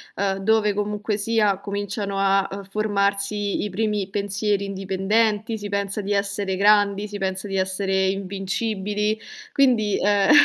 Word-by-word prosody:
uhm, 195 0 0
dove 210 +1 +2
comunque 210 +1 -2
sia, 210 -2 +1
cominciano 200 0 -3
a, 195 0 +3
uhm, 200 +1 -6
formarsi 200 0 0
i 210 - -2
primi 210 0 -1
pensieri 205 0 -1
indipendenti, 200 +3 0
si 205 -1 -6
pensa 200 0 -2
di 205 +1 -2
essere 200 -1 -1
grandi, 205 +1 +3
si 205 - -5
pensa 190 0 -2
di 195 - -1
essere 190 0 0
invincibili 200 +2 -2 0.3
quindi 235 -7 +3
ehm, 205 +4 +3
200 Hz, 140 wpm, -23 LUFS, 195-210 Hz, 0.3 s, a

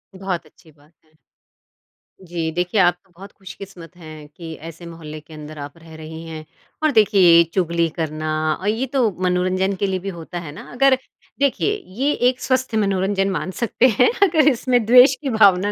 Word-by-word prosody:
बहुत 185 -4 -4
अच्छी 160 +1 -21
बात 150 +2 -26
है। 155 0 -32 1.1
जी, 170 -3 -4
देखिए 180 +4 -1
आप 175 0 +4 0.2
बहुत 195 +2 -12
खुशकिस्मत 185 -3 -12
हैं 155 -3 -11
कि 160 +2 -10
ऐसे 165 +1 -11
मोहल्ले 155 -2 -9
के 160 - -16
अंदर 150 0 -10
आप 145 +3 -8
रह 165 -1 -14
रही 160 +1 -9
हैं। 155 -1 -8 0.4
और 310 - +3
देखिए 210 -4 +3
ये 170 -1 +7
चुगली 170 -2 +1
करना 155 -1 -3 0.3
अ, 185 - -8
ये 225 +5 0
तो 245 -5 +3
मनोरंजन 185 +2 0
के 200 - 0
लिए 190 -1 -2
भी 195 +2 -5
होता 170 0 -7
है 160 -4 -8
ना, - - -10
अगर 265 +2 +4 0.4
देखिए 280 +9 +1 0.3
ये 275 +3 +1 0.2
एक 255 - -5
स्वस्थ 255 -2 -1
मनोरंजन 195 -1 0
मान 185 0 -3
सकते 235 +2 +3
हैं 250 - +6
अगर 315 -6 +3
इसमें 245 -1 +1
द्वेष 250 +3 +7
की 275 - -3
भावना 205 -3 +4
185 Hz, 185 wpm, -20 LUFS, 165-215 Hz, 1.1 s, ये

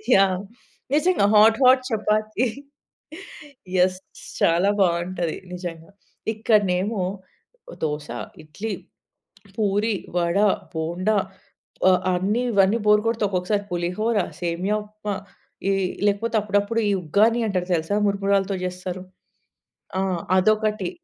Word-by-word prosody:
Yeah! 190 -1 +3 0.5
నిజంగా. 335 - +3
Hot, 220 +3 +6
hot 255 0 +6
chapati. 215 +2 0 1.3
Yes. 185 +1 +3 0.4
చాలా 175 +4 +3
బావుంటది 175 -1 0 0.2
నిజంగా. 175 -1 -7 0.4
ఇక్కడనేమో 205 -2 +1 0.8
దోస, 150 -1 -2 0.4
ఇడ్లీ, 200 +8 -5 0.8
పూరి, 210 +1 +1 0.2
వడ, 170 +1 +1 0.4
బోండా 175 +6 0 0.7
ఆహ్, 185 - +4
అన్ని 195 +6 0
ఇవన్నీ 200 +3 +4
బోర్ 210 0 +5
కొడితే 225 -2 0
ఒక్కొక్కసారి 200 +2 -1
పులిహోర, 180 +6 -1 0.2
సేమియా 180 +4 -1
ఉప్మా 210 -1 -5 0.5
ఈ - - +3 0.3
లేకపోతే 220 +3 0
అప్పుడప్పుడు 205 +2 0
ఈ - - +2
ఉగ్గాని 215 +9 +3
అంటారు 180 -3 -1
తెలుసా? 165 +4 -1
మురుమురాలతో 200 0 +1
జేస్తారు. 180 0 -5 1.0
ఆ! - - +1 0.4
అదొకటి. 215 -1 +1
200 Hz, 100 wpm, -23 LUFS, 180-215 Hz, 1.3 s, Hot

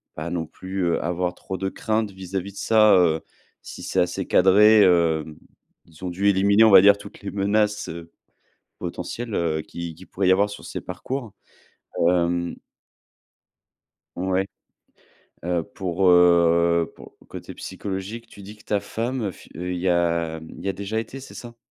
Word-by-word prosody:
pas 80 +2 -5
non 85 -2 -2
plus, 95 +2 -5
heu, 85 -1 0
avoir 90 +1 -1
trop 95 - -6
de 95 +2 -2
craintes 110 0 -2
vis-à-vis 95 +1 -5
de - - -15
ça, 110 -2 +5
heu, 80 -3 +3 0.4
si - - -10
c'est - - -1
assez 90 +2 0
cadré. 105 +3 +6
Hem, 80 -4 +2 0.5
ils 85 +2 -17
ont - - -2
dû 95 +3 -1
éliminer, 100 +3 +4
on 110 - +6
va 95 - +10
dire, 100 0 +6
toutes 100 0 -13
les 100 - -5
menaces, 105 +1 0
heu, 85 0 -8 0.7
potentielles, 120 -2 -5
heu, 80 -2 0
qui 85 0 -7
qui 90 +4 -14
pourraient 95 -1 -1
y - - +7
avoir 100 +2 +2
sur 100 - -10
ces - - -6
parcours. 130 -6 -5 0.7
Hem. 85 0 +1 1.6
Ouais. 95 +1 0 1.0
Heu, 85 -1 0
pour, 95 -2 -1
heu, 85 -1 +4
pour - - -14
côté - - -9
psychologique, 100 +4 -6
tu 100 - -14
dis 105 +2 -11
que 105 - -21
ta 105 -2 0
femme, 115 +1 -3
fi - - -17
y 90 +1 -3
a 85 -2 0 0.2
y 100 - -4
a - - +1
déjà 100 +3 -4
été, 120 +4 -6
c'est 135 - -12
ça? 120 -1 -10
95 Hz, 165 wpm, -23 LUFS, 85-100 Hz, 1.6 s, va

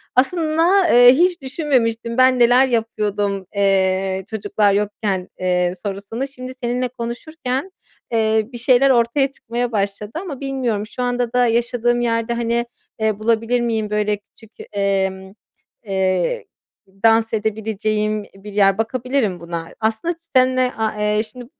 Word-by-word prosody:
Aslında, 330 +6 +3
eee, 245 +1 +8
hiç 350 +3 +2
düşünmemiştim 245 -5 -1
ben 255 0 +5
neler 245 +2 +5
yapıyordum, 205 -5 -1
eee, 190 -1 +1
çocuklar 205 -1 +1
yokken, 200 -2 -1
eee, 180 -1 +1
sorusunu. 205 +6 -4
Şimdi 255 -1 -8
seninle 245 +1 0
konuşurken, 255 +6 -5 0.4
eee, 220 -1 +1
bir - - -5
şeyler 255 +3 +4
ortaya 260 +2 +2
çıkmaya 240 -2 -4
başladı 205 0 -2
ama 315 -9 -7
bilmiyorum 255 -7 -2
şu 250 - -5
anda 245 -1 -1
da 250 0 +4
yaşadığım 240 +1 +1
yerde, 230 0 0
hani, 235 0 -1 0.3
eee, 215 -1 0
bulabilir 230 +2 +1
miyim 225 -3 -1
böyle 210 0 0
küçük, 215 +2 -21 0.3
emm, 190 -1 -1 0.5
ıııı, 190 - 0 0.6
dans 225 0 +4
edebileceğim 215 0 -1
bir 200 +1 -11
yer, 195 -2 +4
bakabilirim 235 -3 -1
buna. 170 -1 -6
Aslında 220 +10 -1
ç - - -38
seninle, 255 0 +3
aaa, 220 -1 -1 0.2
eee, 215 - +2
şimdi 240 +3 -8
230 Hz, 135 wpm, -20 LUFS, 205-250 Hz, 0.6 s, eee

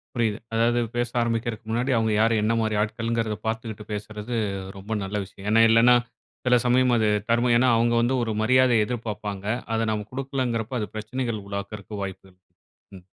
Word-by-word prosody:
புரியுது. 115 -3 +1 0.2
அதாவது 115 +1 +2 0.2
பேச 120 0 0
ஆரம்பிக்கிறதுக்கு 115 -1 -2
முன்னாடி 120 +4 0
அவங்க 110 -1 +1
யாரு? 115 +1 +3
என்ன 110 +2 +2
மாரி 110 -1 0
ஆட்கள்கிறத 115 0 -1
பார்த்துக்கிட்டு 110 -1 -4
பேசுறது 105 +3 -5 0.4
ரொம்ப 100 +3 -5
நல்ல 95 +2 -5
விஷயம். 95 +1 -11
ஏன்னா, 115 +1 +6
இல்லன்னா, 115 +2 +6 0.5
சில 125 -1 +5
சமயம் 125 0 +4
அது 110 -1 +2 0.2
தர்மம். 120 +1 +3
ஏன்னா, 130 +1 +4
அவங்க 120 +1 +2
வந்து 120 +3 +1
ஒரு 115 -2 -2
மரியாதைய 120 -1 +4
எதிர்பார்ப்பாங்க. 105 -4 -5 0.3
அதை 115 0 +1
நாம 105 -1 -2
குடுக்கலங்கிறப்ப, 130 -3 -2
அது 105 - -2
பிரச்சனைகள் 110 0 -3
உருவாக்குறதுக்கு 100 +1 -6
வாய்ப்புகள் 95 -1 -8 0.6
ம். 90 -1 -14
115 Hz, 160 wpm, -25 LUFS, 105-120 Hz, 0.6 s, ஏன்னா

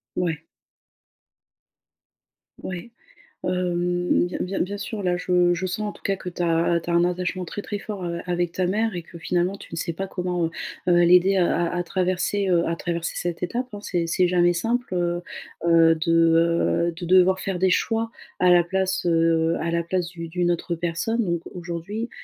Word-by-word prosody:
Mouais. 170 -4 -1 2.2
Ouais. 185 +5 -6 0.5
Hem, 180 -1 +1
bien 175 - -5
bien 190 +2 -2
bien 200 +2 -2
sûr, 210 -1 -5
là 180 -1 +1
je 180 -1 +2
je 180 +2 -2
sens 210 +3 -3
en - - -5
tout - - -17
cas 195 - 0
que 185 - -6
tu 175 - -6
as 170 0 +2
tu - - -6
as 170 - +1
un 170 - +4
attachement 180 +1 -1
très 205 - -6
très 205 - -4
fort, 200 -2 -6
heu, 170 -1 -3
avec 175 -1 -1
ta 185 - 0
mère 215 +2 0
et 175 - -4
que 170 - -12
finalement 180 +3 0
tu - - -13
ne 165 - -5
sais 165 0 -2
pas 195 +3 -4
comment, 180 -2 -1
heu, - - -2 0.4
heu, 175 -1 +5
l'aider, 180 +3 +5
heu, - - +4
à 175 0 +1
à 175 - 0
traverser, 185 +2 0
heu, 170 -2 +3
à 165 - 0
traverser 170 0 -3
cette 175 0 -3
étape, 240 +8 -2
hein, 205 - -7
c'est 175 -4 -1
c'est 180 +2 +2
jamais 175 0 +3
simple, 230 +3 -1
heu, 175 0 0 0.5
heu, 165 -1 +6
de, 160 +1 -1 0.8
heu, - - 0
de 175 +2 -7
devoir 185 +1 +5
faire 190 -2 -3
des 190 - +3
choix 225 +4 +1 0.3
à 180 - +4
la 175 -1 +6
place, 190 +1 -1
heu, 165 -1 +3
à 170 - -2
la 170 0 0
place 175 +1 -1
d'u 170 -2 -7
d'une 175 +1 0
autre 175 0 -1
personne. 175 +8 -1
Donc 170 -4 -1
aujourd'hui, 180 +6 -5
175 Hz, 200 wpm, -24 LUFS, 170-185 Hz, 2.2 s, heu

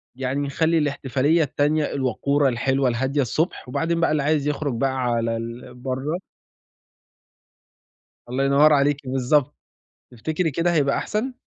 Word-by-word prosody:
يعني 130 +2 -2
نخلّي 160 +4 +1
الاحتفالية 145 +1 +1
التانية 145 +2 0
الوقورة 140 +2 +1
الحلوة 130 +2 +1
الهادية 130 +4 0
الصبح، 155 - -2
وبعدين 165 +5 -1
بقى 165 - +2
اللي 150 -2 +1
عايز 150 -1 +1
يخرج 145 -2 -1
بقى 135 +2 0
على 115 -1 0
ال 115 +2 -7
برّا. 130 +6 -3 2.1
الله 130 +2 -1
ينور 145 +2 +5
عليكِ 145 0 +3
بالضبط، 130 +2 +1 0.6
تفتكري 155 +7 -2
كده 170 +4 0
هيبقى 140 -3 +2
أحسن؟ 230 +5 -2
140 Hz, 130 wpm, -23 LUFS, 130-155 Hz, 2.1 s, ينور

